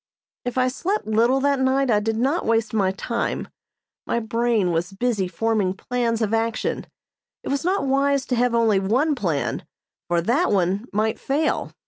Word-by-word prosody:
If 245 +1 -3
I 255 0 +3
slept 360 +11 -2
little 230 +5 +2
that 280 -1 +2
night 265 0 +2
I 210 - +4
did 220 +1 -1
not 275 +9 +1
waste 225 -1 0
my 200 -4 +2
time. 235 +5 -3 0.6
My 235 - 0
brain 230 -4 0
was 170 +3 -2
busy 210 -2 0
forming 195 +1 0
plans 235 +1 -1
of 215 0 -1
action. 225 0 -1 0.6
It - - -5
was 280 0 -1
not 370 -1 0
wise 275 0 +1
to 250 - -1
have 245 0 +2
only 225 -4 +3
one 250 +11 +1
plan, 175 - -2 0.4
for 175 -1 +1
that 240 - +1
one 195 +3 +1
might 215 +2 0
fail. 295 +3 -1
230 Hz, 170 wpm, -23 LUFS, 210-265 Hz, 0.6 s, I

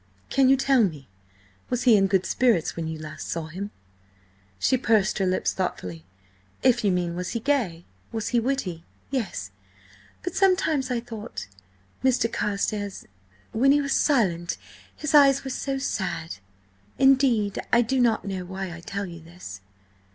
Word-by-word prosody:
Can 270 -1 +4
you 270 - +6
tell 265 -2 +4
me–was 100 - -6
he 240 -3 +7
in 195 -1 +4
good 190 -1 +2
spirits 235 -10 +2
when 160 -1 -3
last 155 0 -7
you - - -8
saw 165 -1 -2
him?" 195 +5 -5 0.9
She 260 - +2
pursed 215 -5 +2
her 190 - +2
lips 185 - +1
thoughtfully. 90 - -4 0.6
"If 245 -2 +4
you 200 - +3
mean 175 -1 -1
was 180 +1 -4
he 230 - -1
gay, 225 -11 0 0.3
was 225 -2 -2
he 240 - +3
witty–yes. 205 - -4 0.7
But 360 - -3
sometimes 325 -8 +2
I 245 -2 -1
thought–Mr. 205 - -4
Carstares, 205 -1 -2 0.5
when 265 +5 +4
he 290 - +5
was 280 -1 0
silent, 185 - +2 0.4
his 305 - -3
eyes 275 -2 +6
were 265 - -4
so 270 +1 -2
sad—! 180 - -3 0.6
Indeed, 260 -7 +3
I 235 +1 +5
do 260 +3 0
not 230 -3 +2
know 190 -2 -3
why 190 0 -5
I - - -10
tell 200 +4 -4
you 170 -2 -9
this." 160 - -10
205 Hz, 150 wpm, -25 LUFS, 170-255 Hz, 0.9 s, he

